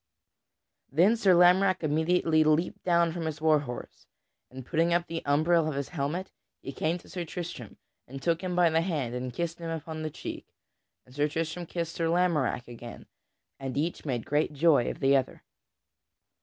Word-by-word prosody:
Then 180 Hz, -, +4 dB
Sir 195 Hz, -5 st, +4 dB
Lamorack 180 Hz, +1 st, +5 dB
immediately 160 Hz, +1 st, +2 dB
leaped 155 Hz, +3 st, +1 dB
down 170 Hz, -2 st, +2 dB
from 165 Hz, -2 st, -3 dB
his 155 Hz, -1 st, -4 dB
war 155 Hz, -1 st, +4 dB
horse 125 Hz, -4 st, -8 dB, 0.4 s
and 130 Hz, -1 st, -10 dB
putting 170 Hz, +2 st, +2 dB
up 175 Hz, 0 st, +1 dB
the 165 Hz, -1 st, -4 dB
umbril 155 Hz, +3 st, +3 dB
of 150 Hz, -, -4 dB
his 140 Hz, -1 st, -3 dB
helmet, 170 Hz, +4 st, -3 dB, 0.3 s
he -, -, -7 dB
came 160 Hz, +5 st, -1 dB
to -, -, -17 dB
Sir 180 Hz, -, -5 dB
Tristram 165 Hz, -, -7 dB, 0.3 s
and 135 Hz, +2 st, -8 dB
took 165 Hz, +3 st, 0 dB
him 180 Hz, -2 st, -3 dB
by 175 Hz, -2 st, +4 dB
the 160 Hz, +1 st, +3 dB
hand 150 Hz, -9 st, -2 dB
and 125 Hz, 0 st, -4 dB
kissed 170 Hz, +6 st, -4 dB
him 165 Hz, -1 st, -5 dB
upon 160 Hz, 0 st, -5 dB
the 155 Hz, -, -3 dB
cheek. -, -, -7 dB, 0.6 s
And 125 Hz, -, -18 dB
Sir 145 Hz, +2 st, +1 dB
Tristram 165 Hz, +3 st, -3 dB
kissed 170 Hz, -1 st, -4 dB
Sir 165 Hz, -, -1 dB
Lamorack 165 Hz, -9 st, +1 dB
again, 120 Hz, 0 st, -10 dB, 0.5 s
and 135 Hz, -1 st, -5 dB
each 165 Hz, +4 st, -2 dB
made 125 Hz, -6 st, -3 dB
great 150 Hz, +1 st, 0 dB
joy 145 Hz, -4 st, +3 dB
of -, -, -7 dB
the 135 Hz, 0 st, +4 dB
other. 135 Hz, -, -1 dB
160 Hz, 185 wpm, -28 LUFS, 140-170 Hz, 0.6 s, Lamorack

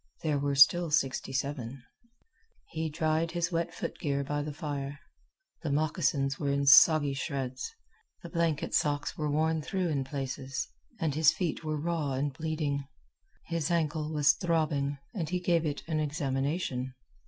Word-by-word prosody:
There 150 Hz, -3 st, +1 dB
were 140 Hz, 0 st, 0 dB
still 165 Hz, +5 st, +6 dB
sixty 135 Hz, -4 st, 0 dB
seven. 135 Hz, -2 st, -3 dB, 0.9 s
He 160 Hz, 0 st, -2 dB
dried 160 Hz, +1 st, 0 dB
his 175 Hz, 0 st, 0 dB
wet 170 Hz, 0 st, -1 dB
foot -, -, -5 dB
gear 140 Hz, -2 st, 0 dB
by 145 Hz, +1 st, -2 dB
the 150 Hz, +1 st, -4 dB
fire. 145 Hz, -2 st, -4 dB, 0.6 s
The 160 Hz, -, -3 dB
moccasins 145 Hz, -2 st, +1 dB
were 145 Hz, -, -1 dB
in 140 Hz, 0 st, +1 dB
soggy 145 Hz, +1 st, +7 dB
shreds. 135 Hz, -2 st, -3 dB, 0.5 s
The -, -, -7 dB
blanket 165 Hz, -4 st, 0 dB
socks 145 Hz, -1 st, +1 dB
were 150 Hz, -1 st, -2 dB
worn 160 Hz, +2 st, +1 dB
through 185 Hz, +2 st, -1 dB
in 140 Hz, -3 st, 0 dB
places, 135 Hz, -1 st, -4 dB, 0.3 s
and 160 Hz, -5 st, 0 dB
his 155 Hz, 0 st, +5 dB
feet 170 Hz, -2 st, -2 dB
were 155 Hz, -1 st, -2 dB
raw 160 Hz, -3 st, -1 dB
and 140 Hz, +1 st, -1 dB
bleeding. 155 Hz, -2 st, -2 dB, 0.6 s
His 165 Hz, -2 st, -2 dB
ankle 155 Hz, -2 st, 0 dB
was 150 Hz, -2 st, +4 dB
throbbing, 150 Hz, -5 st, 0 dB, 0.2 s
and 170 Hz, -7 st, -3 dB
he 180 Hz, 0 st, 0 dB
gave 170 Hz, -2 st, +2 dB
it 145 Hz, -1 st, -3 dB
an 160 Hz, -1 st, 0 dB
examination. 140 Hz, -2 st, -2 dB
150 Hz, 155 wpm, -30 LUFS, 140-160 Hz, 0.9 s, soggy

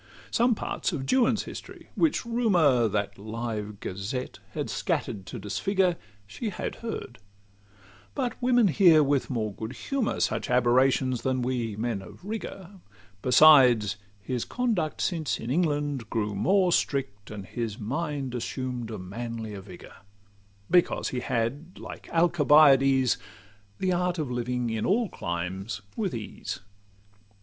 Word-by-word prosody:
Some 240 Hz, 0 st, +3 dB
parts -, -, -2 dB
of 140 Hz, -6 st, -3 dB
Juan's 235 Hz, -, +3 dB
history, -, -, -10 dB
which 315 Hz, -6 st, +1 dB
Rumour, 175 Hz, -, +3 dB
That 100 Hz, -1 st, -2 dB
live 110 Hz, -1 st, -5 dB
gazette, 100 Hz, +7 st, -5 dB
had -, -, -3 dB
scatter'd 95 Hz, -3 st, -2 dB
to -, -, -6 dB
disfigure, 185 Hz, -, 0 dB, 0.3 s
She 160 Hz, -, -5 dB
had 200 Hz, -, -5 dB
heard; 225 Hz, -, -6 dB, 1.0 s
but 250 Hz, -4 st, -1 dB
women 245 Hz, -4 st, +4 dB
hear 165 Hz, -4 st, +6 dB
with 140 Hz, -1 st, +1 dB
more 110 Hz, -5 st, -2 dB
good 110 Hz, +4 st, -6 dB
humour 255 Hz, -, -2 dB
Such -, -, 0 dB
aberrations 125 Hz, 0 st, +3 dB
than 130 Hz, -1 st, 0 dB
we 120 Hz, -4 st, -2 dB
men 110 Hz, -2 st, -2 dB
of 95 Hz, -, -13 dB
rigour: 200 Hz, -3 st, -6 dB, 0.4 s
Besides, 125 Hz, -6 st, +6 dB, 0.2 s
his 120 Hz, +4 st, -3 dB
conduct, 220 Hz, -11 st, -1 dB
since 165 Hz, -4 st, -1 dB
in 115 Hz, -, -4 dB
England, 145 Hz, -6 st, 0 dB
grew 105 Hz, -2 st, -1 dB
more 185 Hz, -, +3 dB
Strict, 100 Hz, -11 st, -1 dB
and 105 Hz, -3 st, -7 dB
his 115 Hz, 0 st, -4 dB
mind 135 Hz, +3 st, -3 dB
assumed 125 Hz, 0 st, -4 dB
a 110 Hz, -, -5 dB
manlier 110 Hz, +2 st, -6 dB
vigour; 95 Hz, -2 st, -12 dB, 0.7 s
Because 175 Hz, 0 st, +3 dB
he 125 Hz, -, -2 dB
had, 130 Hz, +8 st, -2 dB
like -, -, -9 dB
Alcibiades, 145 Hz, -6 st, +5 dB, 0.6 s
The 185 Hz, -1 st, 0 dB
art 180 Hz, 0 st, 0 dB
of 150 Hz, -6 st, -3 dB
living 125 Hz, -1 st, -1 dB
in 110 Hz, -1 st, -2 dB
all 220 Hz, +1 st, +2 dB
climes 95 Hz, +4 st, -4 dB
with 195 Hz, -, -2 dB
ease. 110 Hz, -2 st, -6 dB
130 Hz, 135 wpm, -27 LUFS, 110-175 Hz, 1.0 s, hear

